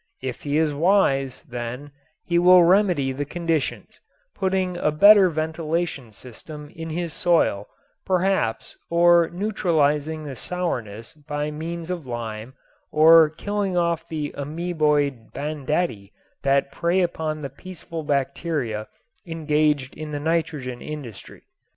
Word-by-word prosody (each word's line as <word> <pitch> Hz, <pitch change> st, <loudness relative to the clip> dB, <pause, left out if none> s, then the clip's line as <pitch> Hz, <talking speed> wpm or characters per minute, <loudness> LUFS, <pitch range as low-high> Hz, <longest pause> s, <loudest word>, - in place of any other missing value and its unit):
If 130 Hz, -2 st, -4 dB
he 145 Hz, 0 st, -1 dB
is 155 Hz, -2 st, +2 dB
wise, 140 Hz, -6 st, +2 dB
then, 125 Hz, +1 st, -6 dB, 0.3 s
he 170 Hz, -1 st, +2 dB
will 180 Hz, 0 st, +7 dB
remedy 175 Hz, -7 st, +3 dB
the 135 Hz, +2 st, -3 dB
conditions, 165 Hz, 0 st, -3 dB, 0.3 s
putting 190 Hz, -1 st, -1 dB
a 165 Hz, -, +1 dB
better 200 Hz, +5 st, +7 dB
ventilation 160 Hz, -4 st, -3 dB
system 145 Hz, +7 st, -11 dB
in 165 Hz, 0 st, -6 dB
his 170 Hz, 0 st, -3 dB
soil 160 Hz, -, +1 dB, 0.4 s
perhaps 185 Hz, -11 st, 0 dB
or 170 Hz, 0 st, +5 dB
neutralizing 160 Hz, -6 st, 0 dB
the 140 Hz, -3 st, -6 dB
sourness 115 Hz, -, -4 dB
by 150 Hz, 0 st, -4 dB
means 165 Hz, +3 st, -5 dB
of 170 Hz, -7 st, -5 dB
lime 115 Hz, +1 st, -6 dB, 0.4 s
or 160 Hz, +1 st, +7 dB
killing 195 Hz, +3 st, -2 dB
off 170 Hz, -1 st, 0 dB
the 150 Hz, -2 st, -4 dB
ameboid 150 Hz, -5 st, -1 dB
banditti 145 Hz, -, -2 dB, 0.3 s
that 140 Hz, 0 st, +1 dB
prey 170 Hz, +5 st, +1 dB
upon 155 Hz, -3 st, -2 dB
the 140 Hz, -, -4 dB
peaceful 165 Hz, +1 st, -8 dB
bacteria 140 Hz, -5 st, -2 dB, 0.4 s
engaged 150 Hz, -4 st, 0 dB
in 155 Hz, 0 st, -7 dB
the 145 Hz, -, -3 dB
nitrogen 150 Hz, -5 st, -2 dB
industry. 140 Hz, -9 st, -9 dB
155 Hz, 120 wpm, -23 LUFS, 140-170 Hz, 0.4 s, will